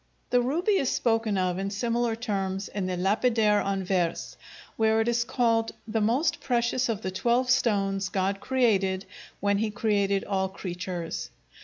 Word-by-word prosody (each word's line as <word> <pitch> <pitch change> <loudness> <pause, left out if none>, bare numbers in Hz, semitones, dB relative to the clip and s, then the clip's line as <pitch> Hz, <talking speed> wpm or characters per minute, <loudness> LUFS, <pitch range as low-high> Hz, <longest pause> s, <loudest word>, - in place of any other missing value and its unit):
The 245 - +4
ruby 345 - +1
is 270 - +1
spoken 225 -3 +1
of 185 -1 0
in 195 +1 -2
similar 230 +2 0
terms 195 -4 -2
in 195 -3 -3
the 180 -1 -2
"Lapidaire 210 +2 +2
en 195 -1 -1
Vers," 180 -3 -1 0.4
where 220 0 +2
it 225 - +1
is 235 0 +2
called 230 -2 +1
"the 220 0 -1
most 275 +9 +1
precious 245 0 0
of 220 -2 -2
the 190 - -2
twelve 240 +6 +1
stones 195 -5 +1
God 195 +1 -1
created 200 -8 +1 0.4
when 200 0 +2
He 220 0 0
created 200 -2 +1
all 190 -1 -1
creatures". 180 -2 -5
210 Hz, 160 wpm, -27 LUFS, 195-235 Hz, 0.4 s, The